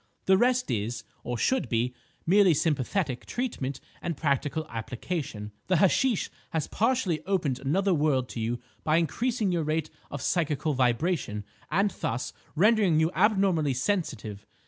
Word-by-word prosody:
The 190 - +6
rest 245 - +2
is, 110 0 -2 0.2
or 120 0 -3
should 260 - +1
be, 120 +1 0 0.3
merely 190 -1 +5
sympathetic 145 -1 0
treatment 180 - -3 0.2
and 170 -4 -3
practical 145 +1 0
application. 115 - -4 0.2
The 185 - +3
hashish 200 - +2 0.2
has 160 -2 -1
partially 210 - 0
opened 165 -10 0
another 185 +9 +1
world 145 -5 +2
to - - -6
you 115 +2 -1 0.2
by 155 +1 +3
increasing 215 - 0
your 170 -2 +1
rate 155 0 -1 0.2
of 145 - -5
psychical 155 -3 0
vibration, 125 - 0 0.3
and 195 +5 +2
thus 125 -4 -3 0.2
rendering 200 -2 +4
you 160 +2 +2
abnormally 185 - +3
sensitive. 120 - -2
155 Hz, 140 wpm, -28 LUFS, 130-190 Hz, 0.3 s, The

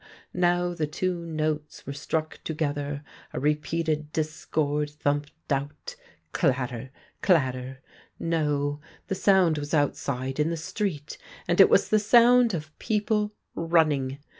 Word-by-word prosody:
Now 175 0 +2
the 160 -3 -1
two 170 +2 -2
notes 155 -1 -3
were 140 - -5
struck 155 +2 -3
together, 145 -2 -2 0.3
a - - -2
re 150 +2 +3
peated 155 0 -2
discord, 150 -1 -1
thumped 145 0 -1 0.2
out 140 +1 -3 0.2
— - - -38
clatter! 125 -1 0 0.3
clatter! 130 -6 +1 0.3
No, 150 -3 0 0.3
the - - +1
sound 185 -5 +3
was 145 +2 -2
outside 135 -2 -1
in 150 +2 +2
the 170 - -2
street, 160 -3 -4 0.3
and - - +5
it - - +8
was - - +4
the 215 - +4
sound 235 +1 +5
of 155 -1 -7
people 210 -1 0 0.2
running. 155 -5 +2
155 Hz, 135 wpm, -26 LUFS, 145-170 Hz, 0.3 s, it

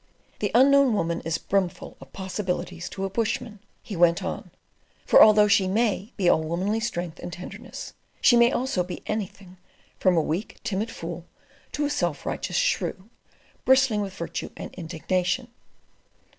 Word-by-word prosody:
"The - - 0
Unknown 275 -1 +6
Woman 170 -3 -1
is 165 0 0
brimful 190 -3 -2
of 135 - -13
possibilities 185 -2 -4
to 195 - -4
a - - -2
bushman," 220 0 -2 0.2
he 205 - -6
went 175 +2 +3
on; 185 -1 -5 0.6
"for - - +7
although 210 -1 +7
she 200 -2 +4
MAY 215 +1 0
be 190 -4 +1
all 160 - +4
womanly 185 +7 -1
strength 175 -7 -4
and 175 - -6
tenderness, 180 +1 -8 0.3
she 240 - +6
may 235 +1 +6
also 250 -9 0
be 180 0 -7
anything, 195 -3 -5 0.4
from 185 -2 +3
a - - +5
weak 175 +9 -3
timid 210 +2 -2
fool 170 -3 -7 0.5
to 295 - 0
a - - 0
self - - -1
righteous - - -2
shrew, 230 - -1 0.5
bristling 260 -5 +4
with 195 -2 -5
virtue 170 -2 -5
and - - -7
indignation. 180 +7 -2
195 Hz, 155 wpm, -25 LUFS, 175-225 Hz, 0.6 s, for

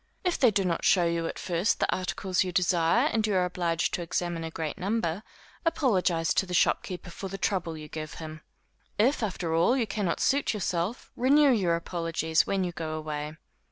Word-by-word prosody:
If 360 -2 0
they 255 - +6
do 195 -2 +1
not 170 -2 -1
show 180 -3 +4
you 170 0 0
at - - -5
first 175 +4 0
the - - +1
articles 185 0 -1
you 185 - -4
desire, 180 - +3
and 220 -1 +1
you 205 - 0
are 180 -1 +3
obliged 170 -2 -1
to - - -1
examine 170 0 -2
a 165 - -4
great 160 -2 -5
number, 195 -2 -1 0.4
apologize 195 - +1
to 190 - +1
the 180 - -2
shopkeeper 180 +1 0
for 195 - -6
the 195 +1 -6
trouble 180 -4 -1
you 155 0 -8
give 155 0 -7
him. 155 -1 -8 0.6
If, 245 +7 +3
after 180 -6 -2
all 170 +11 +3
you 240 - +1
cannot 195 -4 -2
suit 280 -4 +1
yourself, 185 +2 -2
renew 280 +3 +5
your 185 -8 +2
apologies, 165 -1 0
when 195 -1 0
you 180 - -2
go 160 -2 -4
away. 155 0 -5
180 Hz, 195 wpm, -28 LUFS, 165-205 Hz, 0.6 s, they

